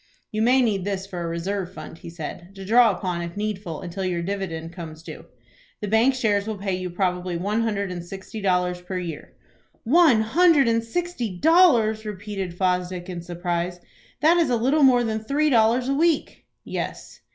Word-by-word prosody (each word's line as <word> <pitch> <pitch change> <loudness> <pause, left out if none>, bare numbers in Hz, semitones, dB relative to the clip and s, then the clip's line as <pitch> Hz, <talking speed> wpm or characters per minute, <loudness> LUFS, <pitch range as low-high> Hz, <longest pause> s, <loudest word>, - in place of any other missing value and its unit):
"You 215 -1 -1
may 250 +3 +4
need 205 -5 0
this 195 -1 -3
for 185 -3 -6
a 170 - -3
reserve 185 +2 -3
fund," 160 - -9
he - - -9
said, 170 +3 -8
"to 195 0 -8
draw 235 +3 +6
upon 180 -3 -2
if 170 +2 -6
needful 205 -6 -4
until 185 +2 -5
your 175 -2 -1
dividend 170 -4 -4
comes 160 -3 -9
due. 155 -2 -9 0.5
The 210 - -4
bank 225 +6 +3
shares 210 -4 +1
will 220 -2 -3
pay 195 -1 -2
you 185 0 -4
probably 180 -1 -1
one 205 +6 -1
hundred 200 -4 -1
and 175 -1 -5
sixty 195 +4 -8
dollars 180 -2 0
per 185 +1 -5
year." 170 -4 -6 0.5
"One 275 -3 +5
hundred 300 +3 +4
and 230 0 +2
sixty 245 - -3
dollars!" 245 - +4
repeated 200 -3 -5
Fosdick, 180 -1 -1
in 175 -2 -5
surprise. 175 0 -3 0.4
"That 325 +3 +5
is 330 -5 +2
a 245 - +2
little 270 +7 +2
more 255 -3 +5
than 220 -1 -1
three 285 +7 0
dollars 235 +2 +3
a 275 - +1
week." 320 +1 0 0.2
"Yes." - - -6
200 Hz, 185 wpm, -24 LUFS, 180-230 Hz, 0.5 s, draw